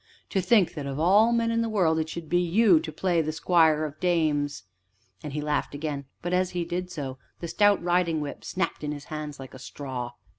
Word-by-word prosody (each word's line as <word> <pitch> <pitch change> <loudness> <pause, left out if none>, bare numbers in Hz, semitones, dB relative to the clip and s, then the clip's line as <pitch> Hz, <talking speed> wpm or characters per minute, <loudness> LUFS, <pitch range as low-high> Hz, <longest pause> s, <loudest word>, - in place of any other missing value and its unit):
To 190 - +1
think 190 0 +3
that 145 -3 -5
of 135 +1 -4
all 205 +8 +5
men 230 -1 +1
in 230 0 +1
the 230 - -1
world 175 -7 +2
it 160 0 -2
should 165 -1 -6
be 175 +3 +2
you 180 +1 +4
to 155 - -6
play 170 +2 +1
the 155 0 -2
squire 160 -1 +3
of 150 0 -8
dames!" 150 -5 0 0.6
And 150 - -6
he 150 - -2
laughed 150 -1 -1
again, 145 -2 -4 0.2
but, 175 +1 -2
as 185 0 +2
he 170 - 0
did 180 +2 -3
so, 135 -6 -6 0.2
the 170 - -5
stout 205 +3 +4
riding 175 -2 +1
whip 145 -1 -6
snapped 185 -4 -3
in 150 0 -2
his 145 -1 -8
hands 150 -1 -5
like 135 -1 -10
a 130 - -10
straw. 130 -3 -6
160 Hz, 225 wpm, -26 LUFS, 150-180 Hz, 0.6 s, all